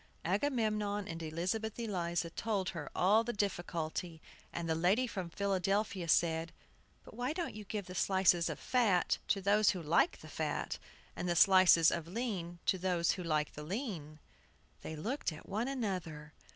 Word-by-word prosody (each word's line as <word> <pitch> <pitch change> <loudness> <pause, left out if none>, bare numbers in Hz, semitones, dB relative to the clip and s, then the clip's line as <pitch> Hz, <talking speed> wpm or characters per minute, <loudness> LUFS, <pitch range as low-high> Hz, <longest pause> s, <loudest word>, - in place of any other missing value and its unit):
Agamemnon 210 - 0
and 165 0 -6
Elizabeth 185 +8 -2
Eliza 175 -6 -2
told 200 -3 -1
her - - -6
all 210 +5 +4
the 240 - -2
difficulty, 175 -5 -3 0.3
and 170 -1 -4
the 160 - +2
lady 185 +10 +2
from 190 -7 -5
Philadelphia 195 0 0
said, 165 0 +2 0.5
"But - - -14
why 250 +4 -2
don't 345 0 -3
you 210 -1 -8
give 205 0 -4
the 180 - -8
slices 185 -2 +3
of - - -4
fat 220 -8 +2
to 200 - +1
those 205 +2 +4
who 180 - 0
like 170 - +2
the - - -11
fat, - - -3 0.4
and 175 0 -3
the 175 - +1
slices 185 -3 +7
of 165 -1 -3
lean 185 -4 -3
to 190 - +2
those 175 -2 +1
who 185 - -4
like 155 -3 0
the 150 - -8
lean?" 170 - -5 0.6
They 160 - -6
looked 220 - -2
at 155 - -11
one 220 +5 -1
another. 180 - -4
185 Hz, 165 wpm, -34 LUFS, 170-210 Hz, 0.6 s, slices